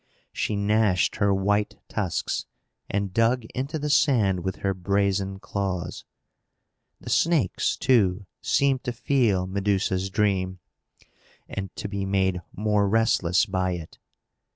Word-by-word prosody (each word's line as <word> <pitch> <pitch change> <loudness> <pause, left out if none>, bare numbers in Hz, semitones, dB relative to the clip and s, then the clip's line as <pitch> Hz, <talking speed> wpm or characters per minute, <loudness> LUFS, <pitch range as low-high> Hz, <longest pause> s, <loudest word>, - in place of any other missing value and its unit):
She 105 - -1
gnashed 100 -2 +2
her 100 0 +2
white 105 +2 +1
tusks, 95 -6 -2 0.4
and 100 -2 -2
dug 115 +2 +2
into 135 +5 -3
the 150 0 -2
sand 110 -11 +3
with 95 +1 -3
her 100 -1 -1
brazen 95 +1 0
claws. 95 -3 -4 0.9
The - - -7
snakes, 160 - +2
too, 100 -6 +2 0.2
seemed 135 -2 +2
to 120 - -2
feel 115 -7 +1
Medusa's 95 0 0
dream, 95 -2 0 0.9
and 95 -1 -5
to - - -4
be 100 -1 -3
made 95 -2 +1
more 105 -1 +1
restless 100 -4 +3
by 95 -3 -1
it. 85 -3 -8
100 Hz, 125 wpm, -25 LUFS, 95-110 Hz, 0.9 s, sand